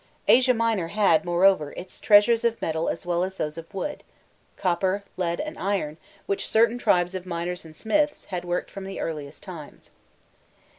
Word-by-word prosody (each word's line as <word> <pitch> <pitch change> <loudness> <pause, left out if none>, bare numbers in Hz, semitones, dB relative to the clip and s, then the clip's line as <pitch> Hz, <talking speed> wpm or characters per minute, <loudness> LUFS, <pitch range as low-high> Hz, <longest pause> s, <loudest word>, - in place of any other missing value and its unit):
Asia 255 0 +6
Minor 225 -6 +1
had, 195 -4 +3
moreover, 175 -3 +3
its 185 - -7
treasures 225 +3 +5
of 230 -1 +1
metal 160 +1 -1
as 165 - -4
well 175 0 +1
as 190 +1 -4
those 150 0 -2
of 165 0 -9
wood 290 +10 -4 0.5
copper, 190 +2 0
lead, 170 -2 -1
and 305 0 -5
iron, 185 -6 -1 0.3
which 200 - -2
certain 230 +2 +3
tribes 180 -5 +2
of 185 -1 -6
miners 175 0 -4
and 160 -1 -13
smiths, 295 - 0
had 175 -1 -2
worked 175 0 -2
from 195 -1 -7
the 195 0 -6
earliest 150 -2 -5
times. 165 -6 -10
185 Hz, 170 wpm, -25 LUFS, 170-215 Hz, 0.5 s, Asia